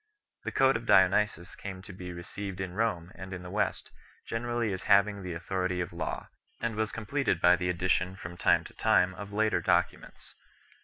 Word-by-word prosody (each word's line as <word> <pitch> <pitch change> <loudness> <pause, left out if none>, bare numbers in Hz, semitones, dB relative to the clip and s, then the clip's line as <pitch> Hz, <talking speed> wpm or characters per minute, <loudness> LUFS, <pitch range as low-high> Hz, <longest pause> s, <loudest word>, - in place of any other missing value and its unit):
This - - -5
Code 135 -2 +5
of 115 +1 -10
Dionysius 95 -1 +3
came 95 -2 -7
to 95 - -10
be 90 0 -7
received 95 +2 -6
in 95 -2 -4
Rome 95 -5 -1
and 95 0 -9
in 90 -1 -6
the 90 - -8
West 100 -1 -1 0.3
generally 120 -2 -1
as 95 - -4
having 100 0 +4
the 90 -2 -5
autho 90 +2 -2
rity 90 -1 -2
of 90 0 -3
law, 85 -2 -4 0.3
and 115 -2 -2
was 110 0 -1
completed 115 - -1
by 90 +1 +6
the 90 0 -2
addition 90 +1 +1
from 85 -2 -8
time - - +3
to - - -12
time 90 +1 +3
of 100 +1 -8
later 110 -3 +1
documents. - - -1
95 Hz, 195 wpm, -29 LUFS, 90-105 Hz, 0.3 s, by